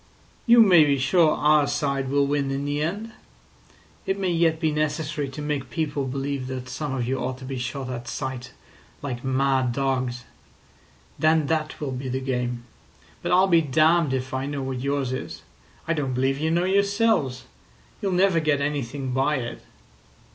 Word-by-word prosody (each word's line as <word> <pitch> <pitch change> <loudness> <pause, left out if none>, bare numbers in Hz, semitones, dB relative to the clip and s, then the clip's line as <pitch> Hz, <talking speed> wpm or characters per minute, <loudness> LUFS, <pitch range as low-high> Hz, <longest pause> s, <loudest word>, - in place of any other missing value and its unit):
"You 235 0 +8
may 180 -6 +7
be 140 -2 +2
sure 155 +4 +3
our 150 -1 +4
side 140 -2 -1
will 140 +1 +2
win 140 -1 0
in 135 +1 -2
the 145 +1 -1
end. 205 +8 -3 1.0
It 195 - 0
may 190 -2 0
yet 165 -1 +2
be 160 -2 +1
necessary 150 -1 -2
to 145 +3 -7
make 145 -3 -3
people 145 -4 -2
believe 135 0 -3
that 130 -1 -6
some 140 0 -3
of 120 -2 -2
you 130 +1 -1
ought 130 0 -3
to 130 - -10
be 130 -1 -4
shot 125 +2 -4
at 120 -2 -6
sight 130 -2 -5 0.5
like 125 -4 -4
mad 130 -1 +1
dogs. 130 -2 -1 1.0
Then 155 -1 +3
that 155 0 -2
will 145 -3 -3
be 130 0 -4
the 130 +1 -1
game. 125 -2 -3 0.6
But - - -2
I'll 185 +2 +5
be 170 -3 +4
damned 155 +1 +3
if 130 0 -4
I 130 +1 -2
know 140 -1 -3
what 130 -1 -3
yours 140 -1 -1
is. 130 - -6 0.4
I 165 - +2
don't 135 -5 -2
believe 135 +2 +1
you 160 +1 0
know 170 +2 +1
yourselves. 200 - +1 0.6
You'll 195 - -1
never 185 -1 +3
get 155 -2 +1
anything 140 -2 -3
by 135 +4 +1
it." 120 -3 -5
140 Hz, 180 wpm, -24 LUFS, 130-155 Hz, 1.0 s, You